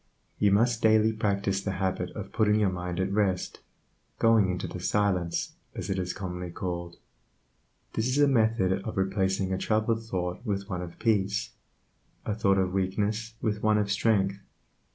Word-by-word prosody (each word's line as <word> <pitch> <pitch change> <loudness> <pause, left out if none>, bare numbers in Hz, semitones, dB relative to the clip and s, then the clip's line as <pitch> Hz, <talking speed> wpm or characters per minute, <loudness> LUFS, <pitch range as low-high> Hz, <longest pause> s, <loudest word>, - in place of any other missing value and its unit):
You 105 -1 +4
must 115 +3 +3
daily 110 0 +4
practice 100 -2 0
the 95 -1 -2
habit 95 -2 -1
of 100 -2 -6
putting 105 -1 +3
your 100 -3 +2
mind 90 -1 -4
at 95 +1 0
rest, 100 -3 0 0.6
"going 115 -4 +4
into 90 0 -2
the 90 - -6
silence," 90 -3 0 0.2
as - - -4
it 95 - 0
is 90 0 -2
commonly 90 -2 -5
called. 85 0 -4 1.0
This 110 +2 0
is 130 +2 0
a 145 0 +5
method 110 -7 +2
of 110 - -5
replacing 95 0 0
a 95 - -1
troubled 110 +2 0
thought 90 -3 -3
with 100 -4 -2
one 90 -3 -3
of 85 -1 -8
peace, 105 -2 +1 0.7
a 105 - -1
thought 100 -2 +2
of 95 -1 +1
weakness 105 +4 -1
with 105 -1 0
one 110 0 +3
of 105 -1 0
strength. 100 -2 +2
100 Hz, 170 wpm, -28 LUFS, 95-110 Hz, 1.0 s, a